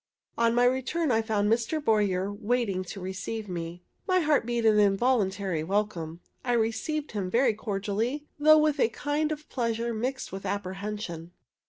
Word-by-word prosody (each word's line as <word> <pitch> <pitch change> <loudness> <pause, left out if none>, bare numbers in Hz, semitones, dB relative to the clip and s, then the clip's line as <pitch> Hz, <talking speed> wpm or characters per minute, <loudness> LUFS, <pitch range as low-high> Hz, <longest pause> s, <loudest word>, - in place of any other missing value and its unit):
On 230 0 +2
my 245 0 +4
return 260 +5 +1
I 225 -1 +3
found 215 -2 0
Mr. 235 +7 0
Boyer 205 -6 +1
waiting 210 -3 0
to 195 - -7
receive 200 +4 -5
me. 175 -1 -5 0.2
My 370 -1 +3
heart 300 -6 +2
beat 235 -1 0
an 215 -1 +5
involuntary 195 -5 +2
welcome. 175 -3 -2 0.2
I 245 - 0
received 240 +7 -1
him 200 -4 -3
very 235 +2 +3
cordially, 215 +6 -2
though 310 +1 +7
with 305 -1 +2
a 225 - +4
kind 295 +5 -1
of 305 0 -5
pleasure 235 -1 -1
mixed 255 +4 -3
with 195 +1 -6
apprehension. 195 -3 -4
220 Hz, 160 wpm, -28 LUFS, 195-250 Hz, 0.2 s, though